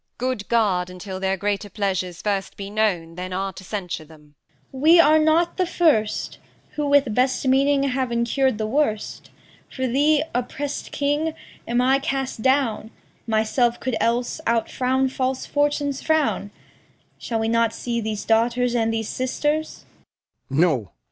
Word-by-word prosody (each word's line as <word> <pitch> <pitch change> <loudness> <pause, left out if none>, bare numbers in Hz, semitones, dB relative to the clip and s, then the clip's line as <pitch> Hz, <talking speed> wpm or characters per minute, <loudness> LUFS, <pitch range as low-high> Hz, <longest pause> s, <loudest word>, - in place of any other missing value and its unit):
Good 255 -4 -3
guard 195 -6 +2
Until 185 +1 -7
their 190 0 0
greater 205 +1 -2
pleasures 185 -4 -2
first 200 -2 -2
be 200 0 -6
known 195 -6 0
That 180 +2 -6
are 195 +1 -2
to 190 - -11
censure 180 -4 -4
them. 150 -1 -18 0.4
Cor. 265 - -8
We 330 +3 +7
are 315 -1 +6
not 320 +2 +2
the 370 -2 +1
first 285 -13 +1 0.3
Who 295 -1 -2
with 280 -5 +3
best 255 +3 +1
meaning 275 +1 +3
have 260 -2 0
incurr'd 235 +1 +1
the 215 - -2
worst. 220 -3 -1 0.4
For 260 - -3
thee, 290 +4 +3
oppressed 275 +4 -3
king, 295 +3 0 0.3
am 240 +1 +1
I 265 +2 +3
cast 270 -3 -3
down; 260 -4 +1 0.4
Myself 230 +2 +1
could 255 -3 -2
else 240 +6 0
outfrown 255 +3 +1
false 260 0 -2
Fortune's 290 -1 0
frown. 315 -9 +1 0.7
Shall 230 - -3
we 220 - 0
not 230 0 +2
see 235 0 -3
these 215 -1 -4
daughters 235 +2 +2
and 225 -2 +1
these 225 -1 -2
sisters? 295 +4 -2
240 Hz, 150 wpm, -23 LUFS, 210-275 Hz, 0.7 s, We